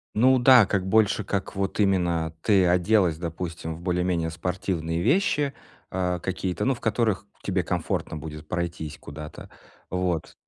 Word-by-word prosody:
Ну 130 +4 +5
да, 125 -2 +7
как 95 -1 -1
больше 110 0 +3
как 100 -1 -3
вот 100 +2 -2
именно 85 -5 +1
ты 100 -3 +4
оделась, 90 -1 +3
допустим, 85 -1 -5
в 85 - -11
более-менее 90 -2 0
спортивные 85 -1 -2
вещи, 150 - +2 0.4
а, 90 -1 -1
какие-то, 95 +1 -2
ну, 135 - +3
в 120 - -9
которых 110 -3 0 0.2
тебе 95 -2 0
комфортно 80 -2 -2
будет 75 0 -8
пройтись 85 -3 -4
куда-то, 75 +1 -9 0.4
вот. 90 -3 -2
90 Hz, 145 wpm, -25 LUFS, 85-100 Hz, 0.4 s, да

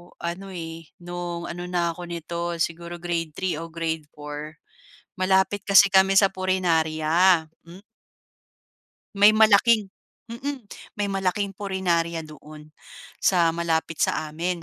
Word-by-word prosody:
ano, 175 +3 -5
eh, 165 -3 -8 0.2
no'ng 175 -1 -5
ano 175 +1 -6
na 175 -1 0
ako 170 - -10
neto 170 0 -4
siguro 170 +1 -3
Grade 165 -3 -3
3 180 -5 -2
o 165 - -6
Grade 160 -2 -4
4 150 +1 -8 0.6
malapit 190 +1 +1
kasi 200 0 +7
kami 190 0 +4
sa 195 - +5
punerarya. 170 -2 +2 0.2
Hmm. 175 +3 -14 1.3
May 205 +2 +6
malaking 215 -1 +4 0.4
mm, 270 +3 -5 0.3
may 205 -1 -2
malaking 195 +1 -1
punerarya 170 -4 -1
doon 155 0 -13 0.5
sa 170 -3 +3
malapit 165 -1 -2
sa 155 -1 0
amin. 170 +2 -3
175 Hz, 125 wpm, -24 LUFS, 165-190 Hz, 1.3 s, kasi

